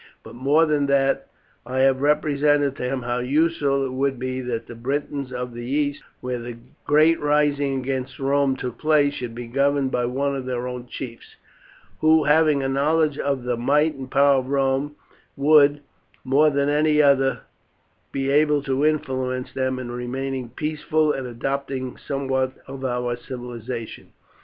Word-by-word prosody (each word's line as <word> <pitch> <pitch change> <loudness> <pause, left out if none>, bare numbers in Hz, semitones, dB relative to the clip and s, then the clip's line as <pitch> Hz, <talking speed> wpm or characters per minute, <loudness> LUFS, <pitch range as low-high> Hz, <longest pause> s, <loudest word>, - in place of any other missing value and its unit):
But - - -11
more 140 +6 +3
than 150 -2 +1
that, 135 0 +1 0.4
I 130 +2 -2
have 135 0 +3
represented 145 -1 +2
to - - -6
him 130 -2 -3
how 120 0 -1
useful 140 0 +1
it 130 - -4
would 135 0 0
be 130 +1 -3
that 120 -2 -4
the - - -10
Britons 140 +2 -3
of 125 -1 -5
the 120 - -7
east, 145 +3 -1 0.2
where 125 -1 -3
the 120 0 -7 0.3
great 155 +3 +4
rising 145 -2 +1
against 130 0 -4
Rome 140 0 +1
took 125 -2 -6
place, 150 -2 +3
should 120 -4 -6
be 120 0 -6
governed 140 +2 +1
by 125 -2 0
one 140 +3 -1
of 135 -2 -5
their 125 -1 -2
own 125 -1 -6
chiefs, 120 -2 -9 0.6
who, 155 0 +4
having 150 -1 +3
a - - 0
knowledge 150 +2 +1
of 140 -3 -1
the 125 0 -1
might 150 +6 +2
and 135 -2 -8
power 140 0 +4
of 130 0 -6
Rome, 135 +1 0 0.4
would, 145 0 +5 0.4
more 140 +4 +4
than 140 -1 0
any 150 +1 +2
other, 140 -2 +3 0.7
be 135 0 -1
able 150 0 +3
to 135 0 -1
influence 130 -4 -1
them 130 -1 -1
in 125 -2 -6
remaining 130 +1 -4
peaceful 155 +3 0
and 135 -3 -4
adopting 130 +1 -3
somewhat 130 -2 -2
of 135 0 -8
our 125 -1 -1
civilization. 120 -2 -7
135 Hz, 165 wpm, -23 LUFS, 125-145 Hz, 0.7 s, would